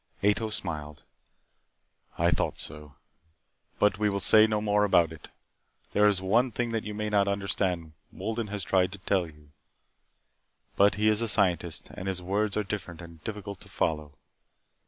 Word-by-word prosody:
Ato 105 +2 +2
smiled. 75 -7 -5 1.1
"I - - +3
thought - - 0
so 75 -1 -7 0.8
But 105 0 +2
we 105 -1 +2
will 100 0 -1
say 110 +3 +7
no 105 -1 0
more 105 0 +2
about 85 -5 +3
it. 80 -3 -11 0.7
There 105 0 +5
is 95 -2 +1
one 120 +6 +2
thing 120 +1 -2
that 115 -1 -2
you 105 -1 -6
may 105 0 -2
not 100 -1 +2
understand. 95 -5 -2 0.2
Wolden 110 +3 -4
has 100 -1 -3
tried 95 0 +2
to - - -7
tell 95 -2 0
you. 75 -1 -17 1.2
But 100 -2 +4
he 105 +2 +1
is 110 +1 +3
a 115 - 0
scientist, 90 -5 +1
and 95 - -7
his 95 -1 -2
words 100 +4 -1
are 105 - +1
different 95 -4 -6
and 85 -2 -12
difficult 100 -2 -6
to - - -14
follow. 75 -3 -2
100 Hz, 170 wpm, -28 LUFS, 85-105 Hz, 1.2 s, say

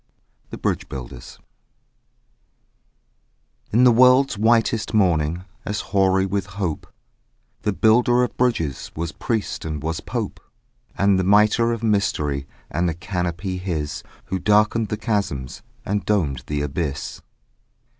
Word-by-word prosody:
THE - - -7
BRIDGE - - -2
BUILDERS 65 -2 -8 2.3
In 120 +4 +4
the 125 - +7
world's 125 +2 +5
whitest 115 +1 +2
morning 85 -3 +2 0.2
As 105 +2 -3
hoary 95 -1 +3
with 100 0 -2
hope, 90 -7 -3 0.7
The 105 - 0
Builder 120 +4 +4
of 125 - -3
Bridges 100 - -1
Was 80 0 -3
priest 110 +5 -3
and 75 -2 -4
was 80 0 -2
pope: - - -4 0.6
And 100 -1 +3
the - - +1
mitre 105 +4 +4
of 115 -1 -3
mystery 75 -10 0 0.2
And 85 +3 0
the 80 - -3
canopy 90 +1 -3
his, 80 -5 -3 0.2
Who 95 - -3
darkened 105 +3 +3
the 105 - -3
chasms 100 - -2 0.2
And 100 +1 -1
domed 70 -12 0
the 75 -1 -1
abyss. 75 0 -4
95 Hz, 125 wpm, -22 LUFS, 80-110 Hz, 2.3 s, the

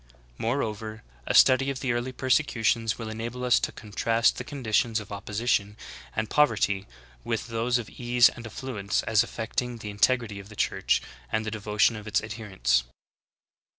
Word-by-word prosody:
Moreover, 110 -3 -2 0.2
a - - 0
study 135 +1 +6
of 135 -2 -3
the 130 - 0
early 120 +2 -2
persecutions 120 -4 +1
will 115 - -6
enable 115 +3 -5
us 125 -1 +4
to - - -2
contrast 115 +2 +1
the - - -4
conditions 120 -4 0
of 105 -1 -10
opposition 105 0 -1 0.4
and 110 0 -1
pov 150 +6 +5
erty 100 -3 -1 0.4
with - - -3
those 115 +2 +1
of 120 -3 -5
ease 120 0 +4
and 115 -1 -6
affluence 110 -4 -2
as 110 -1 +3
affecting 120 +1 -3
the 105 -2 -7
integ 125 +5 +3
rity 105 -3 -7
of 100 - -15
the 105 - -12
Church - - +1 0.3
and 110 0 0
the 110 - -3
devotion 105 +1 +2
of 105 0 -8
its 105 - +2
adherents. 95 - 0
115 Hz, 170 wpm, -27 LUFS, 105-120 Hz, 0.4 s, study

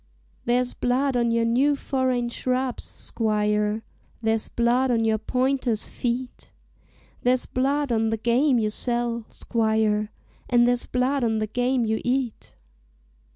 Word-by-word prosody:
"There's 245 +1 +1
blood 260 +2 0
on 235 -1 +2
your 230 0 +2
new 265 +5 +3
foreign 260 -3 -1
shrubs, 255 +1 -2
squire, 210 -1 -1 0.4
There's 220 -1 0
blood 240 +2 +1
on 230 -2 +2
your 220 -1 +2
pointer's 255 -1 0
feet; 245 +1 -4 0.7
There's 250 0 +2
blood 275 +2 0
on 225 -1 +1
the 225 - -1
game 245 +4 +2
you 215 -2 0
sell, 235 0 -1
squire, 220 -2 0 0.4
And 240 -1 +4
there's 245 0 0
blood 255 +2 0
on 220 -1 +1
the 215 - 0
game 245 +3 0
you 220 0 -1
eat. 250 -2 -2
240 Hz, 135 wpm, -24 LUFS, 225-255 Hz, 0.7 s, And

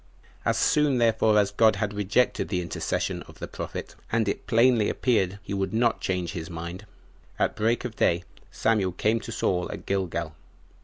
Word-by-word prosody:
As - - +2
soon 150 -3 +3
therefore 110 -2 +3
as 100 -1 +3
God 110 -1 +4
had 105 -2 -2
rejected 105 +5 +1
the 90 -3 -1
intercession 85 - -2
of - - -14
the - - -6
prophet, - - -6 0.2
and 115 -1 +1
it 100 - -3
plainly 115 -2 +4
appeared 100 -7 +1
he - - -5
would 95 +2 -1
not 115 -1 +2
change 90 -2 -1
his 85 -4 -6
mind, 85 +4 -7 0.5
at - - +1
break 115 +3 +1
of 115 -3 -6
day 85 +1 +2 0.3
Samuel 100 -5 +1
came 110 +5 +1
to 115 - -8
Saul 90 -5 0
at - - -8
Gilgal. 85 -5 -2
105 Hz, 175 wpm, -26 LUFS, 90-115 Hz, 0.5 s, God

